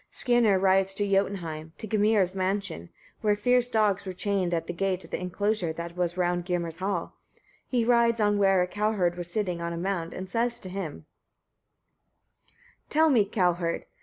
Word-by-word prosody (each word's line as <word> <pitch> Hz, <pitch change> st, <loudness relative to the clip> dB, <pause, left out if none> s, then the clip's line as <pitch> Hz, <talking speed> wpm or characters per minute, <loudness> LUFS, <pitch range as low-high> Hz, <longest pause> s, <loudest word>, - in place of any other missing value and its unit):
Skirnir 240 Hz, -5 st, +3 dB
rides 190 Hz, 0 st, +3 dB
to 205 Hz, 0 st, 0 dB
Jotunheim, 170 Hz, -5 st, -1 dB
to -, -, -6 dB
Gymir's 210 Hz, -3 st, +2 dB
mansion, 190 Hz, -, -2 dB, 0.3 s
where 210 Hz, -1 st, +2 dB
fierce 245 Hz, +3 st, +2 dB
dogs 210 Hz, -4 st, +2 dB
were 190 Hz, -2 st, -5 dB
chained 190 Hz, -1 st, -1 dB
at 170 Hz, -1 st, -1 dB
the -, -, -5 dB
gate 190 Hz, +1 st, -1 dB
of -, -, -17 dB
the -, -, -3 dB
enclosure 185 Hz, 0 st, -1 dB
that 170 Hz, +1 st, -7 dB
was 175 Hz, 0 st, -1 dB
round 175 Hz, -1 st, 0 dB
Gymir's 170 Hz, -2 st, -2 dB
hall. 190 Hz, -2 st, -3 dB, 0.5 s
He 240 Hz, -3 st, 0 dB
rides 235 Hz, -1 st, +3 dB
on 205 Hz, -1 st, +3 dB
to 205 Hz, -, 0 dB
where 195 Hz, -2 st, +4 dB
a -, -, -2 dB
cowherd 205 Hz, -3 st, 0 dB
was 175 Hz, -1 st, -3 dB
sitting 180 Hz, -3 st, -2 dB
on 170 Hz, 0 st, -3 dB
a -, -, -4 dB
mound, 175 Hz, -2 st, -3 dB
and 185 Hz, -, -6 dB
says 235 Hz, +3 st, -1 dB
to 185 Hz, -, -8 dB
him: 185 Hz, -4 st, -4 dB
11. 150 Hz, -, -14 dB, 1.8 s
Tell 315 Hz, +1 st, +4 dB
me, 225 Hz, -6 st, +4 dB
cowherd! 180 Hz, -4 st, 0 dB
190 Hz, 185 wpm, -27 LUFS, 175-210 Hz, 1.8 s, where